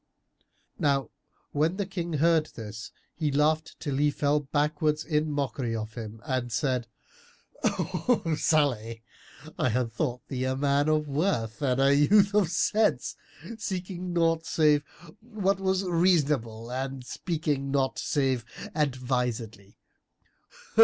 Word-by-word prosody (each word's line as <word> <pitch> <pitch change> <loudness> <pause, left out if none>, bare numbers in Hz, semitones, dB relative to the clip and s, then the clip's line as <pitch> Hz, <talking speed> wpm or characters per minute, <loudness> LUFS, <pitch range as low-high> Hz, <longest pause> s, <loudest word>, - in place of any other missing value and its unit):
Now 140 -4 +1 0.4
when 160 +5 +1
the 200 - -1
King 175 -3 -4
heard 160 +1 +3
this, 110 -1 -7 0.2
he 155 -3 -1
laughed 155 +3 +1
till 140 -4 -2
he 145 +1 +3
fell 145 +1 +1
backwards, 150 +2 0
in 155 -1 +1
mockery 135 -5 -2
of 110 0 -5
him 110 -2 -7
and 130 -4 -1
said, 125 0 0 0.8
"O 225 -10 0
Salih, 120 -8 +1 0.6
I 130 - +2
had 120 0 -1
thought 125 -1 -2
thee 130 -2 -2
a 130 0 0
man 140 +2 +2
of 155 -1 +2
worth 140 - -1
and 130 -2 +1
a 135 +1 +5
youth 200 +7 +5
of 205 -4 +3
sense, 210 +5 +1 0.4
seeking 185 -3 -4
naught 165 -1 +2
save 150 -2 +4 0.4
what 205 -4 -1
was 190 0 +1
reasonable 150 -11 +1
and 130 0 -4
speaking 150 -4 -2
not 135 -1 0
save 135 -5 0 0.3
advisedly. 125 -7 -2
145 Hz, 125 wpm, -28 LUFS, 125-165 Hz, 0.8 s, a